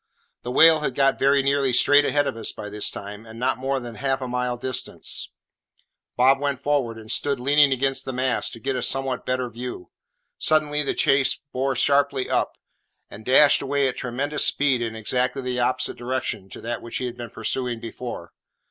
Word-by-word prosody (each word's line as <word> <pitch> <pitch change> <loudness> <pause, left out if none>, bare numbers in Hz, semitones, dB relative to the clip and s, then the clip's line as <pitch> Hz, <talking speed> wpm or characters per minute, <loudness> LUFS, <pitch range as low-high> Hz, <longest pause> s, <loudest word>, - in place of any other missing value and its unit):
The 120 - -6
whale 160 +5 +6
had 135 -4 -2
got 135 -1 +2
very 140 0 +3
nearly 140 -1 +2
straight 145 +4 +5
ahead 145 0 +2
of - - -2
us 115 - -3
by 105 - -8
this 105 0 -2
time, 105 +1 -8
and 110 0 -12
not 125 0 0
more 135 +1 -1
than 120 -2 -8
half 135 +4 -1
a 130 - -4
mile 125 0 -2
distant. 125 +1 -5 1.1
Bob 135 +2 +5
went 140 -2 -1
forward, 140 -5 0
and 110 -1 -7
stood 140 -2 -1
leaning 145 +2 +4
against 135 0 0
the - - -3
mast, 130 -1 -1
to 115 - -9
get 135 +2 -2
a 125 - -2
somewhat 135 0 -1
better 125 0 0
view. 120 -5 -7 0.5
Suddenly, 150 -1 +2
the 145 - -2
chase 135 -1 +3 0.2
bore 135 +1 0
sharply 140 0 +2
up, - - 0 0.5
and 105 - -10
dashed 135 +4 +5
away 140 0 +1
at 130 - -3
tremendous 140 +4 -1
speed 135 -4 +2
in 115 -1 -3
exactly 125 +4 -1
the 125 -1 -2
opposite 125 +1 -1
direction 120 -5 -3
to - - -10
that 120 +1 -4
which 115 - -5
he 130 - -3
had 120 -1 -5
been 120 -1 -7
pursuing 120 +1 -3
before. 120 +1 -7
130 Hz, 195 wpm, -24 LUFS, 120-140 Hz, 1.1 s, whale